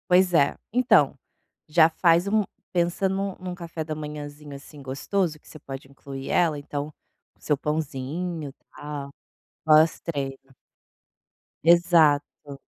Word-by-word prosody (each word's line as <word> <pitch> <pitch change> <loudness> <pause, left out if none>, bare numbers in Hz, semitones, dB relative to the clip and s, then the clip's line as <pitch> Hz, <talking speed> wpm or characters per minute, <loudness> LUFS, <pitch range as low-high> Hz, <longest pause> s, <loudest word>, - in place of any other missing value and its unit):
Pois 180 0 +4
é. 145 -4 +4 0.2
Então, 250 +1 +4 0.5
já 160 +1 +6
faz 170 +2 +3
um 215 +1 +2 0.3
pensa 175 +2 +1
num 195 0 -2
num 180 -1 -5
café 170 -3 -6
da 155 0 -4
manhãzinho, 150 -1 -7
assim, 140 +1 -12
gostoso 155 +5 -2
que - - -22
você 155 - -11
pode 135 -1 -9
incluir 135 0 -8
ela, 160 -4 +2
então 145 0 -4 0.5
o - - -34
seu 150 - +1
pãozinho, 150 +2 -3 0.2
tal, 145 -1 -6 0.5
pós 155 0 +5
treino. 140 -5 -3 1.3
Exato. 155 -4 +3
155 Hz, 125 wpm, -25 LUFS, 145-175 Hz, 1.3 s, já